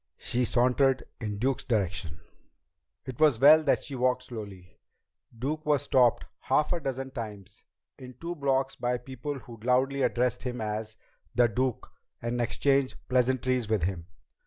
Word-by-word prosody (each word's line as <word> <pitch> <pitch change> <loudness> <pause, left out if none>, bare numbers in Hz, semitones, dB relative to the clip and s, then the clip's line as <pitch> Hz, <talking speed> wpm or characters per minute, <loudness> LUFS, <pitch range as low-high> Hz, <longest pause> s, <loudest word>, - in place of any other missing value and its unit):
She 125 +1 -1
sauntered 130 +3 +2 0.2
in 105 -3 -4
Duke's 130 +5 0
direction. 95 - -2 0.8
It 130 -2 -7
was 150 -7 +4
well 150 +4 +8
that 150 - +1
she 145 - -8
walked 125 0 +1
slowly. 100 -7 -9 0.6
Duke 150 +6 -3
was 150 -2 +2
stopped 130 -5 +3
half 150 +3 +1
a 175 - -1
dozen 135 -2 -4
times 105 -6 -8 0.4
in 125 -1 -10
two 170 +1 -5
blocks 135 -3 0
by 125 0 -1
people 130 +3 -6
who 120 -2 -11
loudly 130 +4 +1
addressed 125 -2 +1
him 125 -1 -4
as 110 0 -4 0.4
"The 120 +1 +5
Duke" 125 +1 -2 0.3
and 120 +1 -2
exchanged 135 +3 +1
pleasantries 130 -2 +1
with 110 -6 +1
him. 85 -2 -3
125 Hz, 150 wpm, -28 LUFS, 110-135 Hz, 0.8 s, well